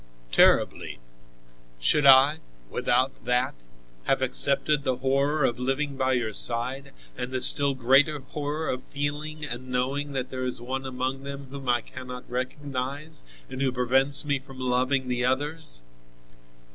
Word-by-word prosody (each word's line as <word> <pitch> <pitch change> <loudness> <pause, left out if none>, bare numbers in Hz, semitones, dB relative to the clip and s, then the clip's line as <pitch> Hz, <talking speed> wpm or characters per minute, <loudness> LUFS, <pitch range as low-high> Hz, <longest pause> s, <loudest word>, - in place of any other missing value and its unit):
"Terribly. - - +2 0.8
Should 140 - +3
I, 135 +3 +6 0.3
without 130 0 0
that, 125 +1 0 0.5
have 135 -1 +1
accepted 140 +3 +3
the 130 -2 0
horror 140 +3 0
of 120 -2 0
living 135 +3 -2
by 130 -1 0
your 120 -3 -1
side, 125 +6 0 0.2
and 125 0 -5
the 130 - -1
still 140 +1 +7
greater 135 +5 +3
horror 150 +3 -5
of 130 - -3
feeling 150 +2 -4
and 130 -1 -7
knowing 135 +3 -2
that 130 -1 -4
there 130 0 -4
is 125 -1 -3
one 130 +2 -5
among 130 +1 -3
them 140 -1 -8
whom 135 -2 -6
I 120 -1 +2
cannot 125 +1 -10
recognize 135 +3 -4 0.2
and 130 - -7
who 135 -1 +1
prevents 135 +4 +3
me 145 -1 0
from 135 -1 -14
loving 130 +1 0
the 125 0 -1
others?" 145 - -2
130 Hz, 145 wpm, -26 LUFS, 125-140 Hz, 0.8 s, still